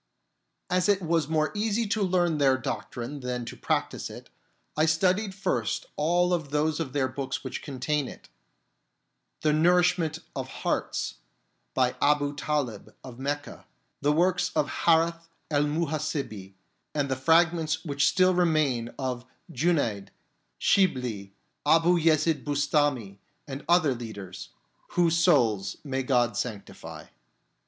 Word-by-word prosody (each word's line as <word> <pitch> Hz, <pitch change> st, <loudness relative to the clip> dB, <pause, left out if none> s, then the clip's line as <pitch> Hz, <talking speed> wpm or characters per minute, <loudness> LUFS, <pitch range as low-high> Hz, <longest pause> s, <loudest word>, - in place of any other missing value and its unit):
As 180 Hz, +1 st, +1 dB
it 200 Hz, -2 st, +3 dB
was 165 Hz, -2 st, +1 dB
more 155 Hz, -1 st, +1 dB
easy 215 Hz, +2 st, 0 dB
to 215 Hz, 0 st, 0 dB
learn 175 Hz, -4 st, +1 dB
their 135 Hz, -2 st, +4 dB
doctrine 130 Hz, +1 st, -5 dB
than 125 Hz, -2 st, -3 dB
to -, -, -7 dB
practise -, -, -2 dB
it, -, -, -11 dB, 0.4 s
I 155 Hz, +1 st, +3 dB
studied 190 Hz, +5 st, +1 dB
first 120 Hz, -, -1 dB
of -, -, -29 dB
all 175 Hz, +3 st, +2 dB
those 150 Hz, +1 st, -1 dB
of 140 Hz, -6 st, -3 dB
their 140 Hz, -2 st, +1 dB
books 135 Hz, 0 st, -4 dB
which -, -, -5 dB
contain 140 Hz, +1 st, -2 dB
it: -, -, -11 dB, 1.1 s
The 155 Hz, -1 st, +2 dB
Nourishment 175 Hz, 0 st, +3 dB, 0.2 s
of -, -, -3 dB
Hearts, -, -, -2 dB, 0.6 s
by -, -, +2 dB
Abu 145 Hz, 0 st, +2 dB
Talib 140 Hz, -7 st, -3 dB
of 125 Hz, -2 st, -10 dB
Mecca, 145 Hz, +2 st, -4 dB, 0.3 s
the 145 Hz, +1 st, +3 dB
works 180 Hz, +3 st, +2 dB
of 145 Hz, -, +2 dB, 0.2 s
Hareth 165 Hz, 0 st, +3 dB, 0.2 s
el 145 Hz, 0 st, +3 dB
Muhasibi, 145 Hz, -, -3 dB, 0.4 s
and 145 Hz, -2 st, +1 dB
the 135 Hz, -, -1 dB
fragments 160 Hz, +3 st, +2 dB
which 140 Hz, -2 st, +2 dB
still 185 Hz, 0 st, +4 dB
remain 155 Hz, -9 st, +1 dB
of 130 Hz, -3 st, -3 dB, 0.3 s
Junaid, 145 Hz, -, 0 dB, 0.5 s
Shibli, 125 Hz, -, +1 dB, 0.3 s
Abu 165 Hz, +4 st, +4 dB
Yezid 155 Hz, -2 st, +2 dB
Bustami 145 Hz, -8 st, 0 dB, 0.3 s
and 135 Hz, 0 st, -6 dB
other 170 Hz, -5 st, +4 dB
leaders 105 Hz, -6 st, -8 dB, 0.4 s
(whose 170 Hz, -2 st, +3 dB
souls 120 Hz, -, +3 dB
may 135 Hz, -2 st, -2 dB
God 125 Hz, -2 st, +1 dB
sanctify). 110 Hz, -5 st, -6 dB
150 Hz, 130 wpm, -27 LUFS, 130-170 Hz, 1.1 s, their